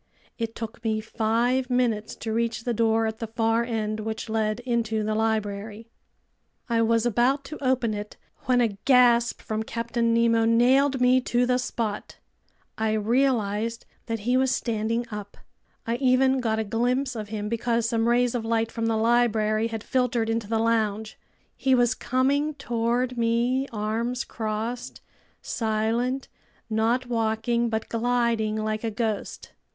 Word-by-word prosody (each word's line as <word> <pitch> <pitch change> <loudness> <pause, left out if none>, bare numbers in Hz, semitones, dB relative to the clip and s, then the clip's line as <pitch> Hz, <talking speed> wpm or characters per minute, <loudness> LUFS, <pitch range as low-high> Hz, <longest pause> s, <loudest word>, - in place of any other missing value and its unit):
It 230 -1 -3
took 225 +1 -7
me 220 -1 0
five 235 +4 0
minutes 235 -4 0
to 220 -1 -4
reach 230 0 -1
the 240 - -1
door 225 0 +2
at 220 +1 -3
the 225 - -4
far 225 +1 +1
end, 220 -2 -2
which 220 +1 -4
led 220 0 0
into 230 -3 -1
the 215 +1 -1
library. 215 0 -2 0.8
I 230 -2 +1
was 230 0 +2
about 245 +5 +2
to 290 +1 -9
open 255 -4 +1
it 210 0 -6 0.3
when 250 -1 +3
a 210 -4 -1
gasp 245 -3 +4
from 215 0 -2
Captain 230 +1 -1
Nemo 230 0 +3
nailed 260 +4 +4
me 250 +1 +5
to 245 +1 +2
the 250 0 +1
spot. 225 -4 -4 0.6
I 220 -1 +1
realized 225 -1 0 0.2
that 225 -2 -3
he 245 +4 +2
was 265 0 +2
standing 230 -1 -1
up. 205 -1 -7 0.5
I 230 +1 -1
even 260 +1 +3
got 225 -3 0
a 220 - 0
glimpse 250 +5 0
of 215 -2 -5
him 210 -1 -4
because 230 +1 0
some 230 -1 +1
rays 245 0 +2
of 240 -2 -2
light 225 0 0
from 230 0 -2
the 225 -1 +1
library 220 -1 +2
had 225 -2 -5
filtered 245 -3 0
into 225 -2 -2
the 225 +1 0
lounge. 220 -1 0 0.4
He 265 -1 +2
was 245 -1 +3
coming 280 +4 0
toward 240 -1 -1
me, 240 +3 +1
arms 230 +3 -2
crossed, 225 +2 -4 0.4
silent, 230 +4 -1 0.4
not 230 +4 +1
walking 235 0 0
but 220 0 -2
gliding 230 -2 0
like 215 0 -2
a 225 - 0
ghost. 220 -1 -3
230 Hz, 155 wpm, -25 LUFS, 220-245 Hz, 0.8 s, me